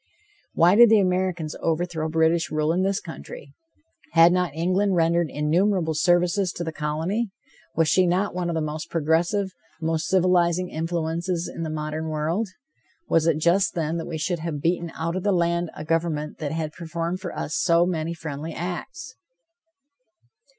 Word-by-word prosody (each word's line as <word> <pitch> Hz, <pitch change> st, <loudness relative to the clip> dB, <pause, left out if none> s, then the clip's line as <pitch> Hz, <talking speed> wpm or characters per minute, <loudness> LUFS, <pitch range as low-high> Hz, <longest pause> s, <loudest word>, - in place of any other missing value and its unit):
Why 175 Hz, +2 st, +5 dB
did 235 Hz, +2 st, +8 dB
the 220 Hz, -1 st, +6 dB
Americans 180 Hz, -4 st, 0 dB
overthrow 165 Hz, -1 st, -1 dB
British 160 Hz, +1 st, +2 dB
rule 155 Hz, +1 st, 0 dB
in 180 Hz, -, +1 dB
this 195 Hz, +1 st, +1 dB
country? -, -, -10 dB, 0.6 s
Had 165 Hz, +1 st, +7 dB
not 180 Hz, -2 st, +1 dB
England 185 Hz, +4 st, +1 dB
rendered 170 Hz, -1 st, +2 dB
innumerable 165 Hz, +3 st, +1 dB
services 175 Hz, +3 st, +2 dB
to 175 Hz, -, -4 dB
the 160 Hz, -, -3 dB
colony? 160 Hz, +9 st, -2 dB, 0.5 s
Was 165 Hz, -1 st, +3 dB
she 185 Hz, +4 st, +4 dB
not 185 Hz, +4 st, +1 dB
one 180 Hz, -1 st, -2 dB
of 170 Hz, -, -2 dB
the 160 Hz, -, 0 dB
most 155 Hz, 0 st, -5 dB
progressive, 170 Hz, +5 st, +1 dB, 0.3 s
most 160 Hz, 0 st, -1 dB
civilizing 180 Hz, -1 st, +2 dB
influences 165 Hz, +2 st, -2 dB
in -, -, -7 dB
the 160 Hz, -, -3 dB
modern 155 Hz, +1 st, -3 dB
world? 160 Hz, +8 st, -1 dB, 0.6 s
Was 165 Hz, 0 st, +3 dB
it 160 Hz, -2 st, +3 dB
just, 175 Hz, +6 st, +2 dB
then, 165 Hz, 0 st, -1 dB
that 165 Hz, -, -5 dB
we 165 Hz, -, -4 dB
should 170 Hz, +2 st, -1 dB
have 160 Hz, -2 st, -4 dB
beaten 170 Hz, +2 st, -1 dB
out 165 Hz, +2 st, -2 dB
of 185 Hz, -, -2 dB
the 205 Hz, -, +1 dB
land 170 Hz, -1 st, +1 dB
a 155 Hz, -, -7 dB
government 160 Hz, -2 st, -1 dB
that 150 Hz, -2 st, -3 dB
had 160 Hz, -1 st, -3 dB
performed 170 Hz, +2 st, -4 dB
for 185 Hz, -, -6 dB
us 155 Hz, -, -3 dB
so 170 Hz, -1 st, +3 dB
many 170 Hz, -2 st, -2 dB
friendly 155 Hz, 0 st, -6 dB
acts? 255 Hz, -, -6 dB
170 Hz, 170 wpm, -24 LUFS, 160-180 Hz, 0.6 s, did